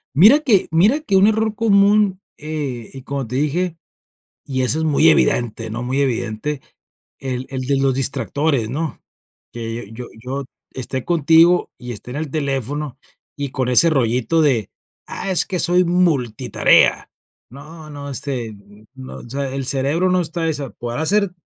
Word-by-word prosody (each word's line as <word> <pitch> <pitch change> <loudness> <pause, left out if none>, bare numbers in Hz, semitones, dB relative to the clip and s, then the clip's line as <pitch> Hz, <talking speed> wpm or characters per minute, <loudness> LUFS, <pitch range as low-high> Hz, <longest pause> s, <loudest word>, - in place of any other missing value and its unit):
Mira 215 - +7
que 230 -11 +2
mira 200 - +3
que 305 -11 -1
un 190 +2 +6
error 220 0 +1
común, 205 -2 +3 0.2
eh, 145 -6 -5
y 135 -1 -9
como 140 0 -4
te 120 +3 -6
dije, 165 +4 -1 0.7
y 130 -2 -2
eso 130 +5 +1
es 160 - -1
muy 155 +1 +4
evidente, 115 -7 +1
¿no?, 120 +3 -4
muy 130 +3 -1
evidente, 125 +2 -2 0.6
el 130 -1 -4
el 130 -1 -4
de 135 +2 0
los 135 -1 +2
distractores, 135 -1 0
¿no? 150 +3 -4 0.5
Que 115 -2 -6
yo 120 +1 -8 0.2
yo 135 +2 -4 0.3
esté 130 0 -4
contigo 170 +1 +4
y 125 -1 -7
esté 120 +3 -10
en 135 - -5
el 155 -2 -4
teléfono 140 -1 -2 0.4
y 140 -1 -3
con 130 -2 -2
ese 125 +7 +6
rollito 125 +1 +1
de, 125 -9 +1 0.4
ah, - - -5
es 180 - +2
que 185 -3 -3
soy 180 +1 +4
multitarea. 140 - +2 0.4
No, 155 +4 -12
no, 145 -1 -8
este, 125 -5 -4 0.4
no, 130 0 -9
o 120 - -12
sea, 135 +1 -3
el 135 -1 -3
cerebro 140 +8 +1
no 185 0 +2
está 165 0 -3
esa 145 -4 -3
podrá 120 +4 -5
hacer 200 +3 +2
140 Hz, 165 wpm, -19 LUFS, 125-165 Hz, 0.7 s, Mira